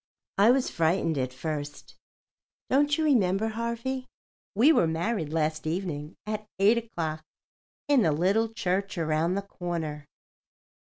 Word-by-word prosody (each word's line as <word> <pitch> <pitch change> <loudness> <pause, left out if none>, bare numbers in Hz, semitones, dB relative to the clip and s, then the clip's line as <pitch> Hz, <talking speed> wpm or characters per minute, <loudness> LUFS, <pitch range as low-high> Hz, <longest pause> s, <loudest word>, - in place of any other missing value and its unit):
I 205 +3 +7
was 255 +1 +3
frightened 165 -2 +1
at 130 -1 -1
first. 145 +2 -6 0.8
Don't 285 +2 +3
you 320 - 0
remember, 220 -7 +2
Harvey? 235 +3 -3 0.5
We 265 +10 +6
were 170 - +3
married 165 0 -1
last 155 -1 -1
evening 160 -3 -3
at 215 0 -4
8 210 +4 +5
o'clock 160 -9 -4 0.6
in 285 -3 +4
the 160 - +3
Little 195 +9 +2
Church 195 -2 -2
Around 160 +2 +1
the 200 - -2
Corner." 165 -6 -5
185 Hz, 130 wpm, -27 LUFS, 160-225 Hz, 0.8 s, I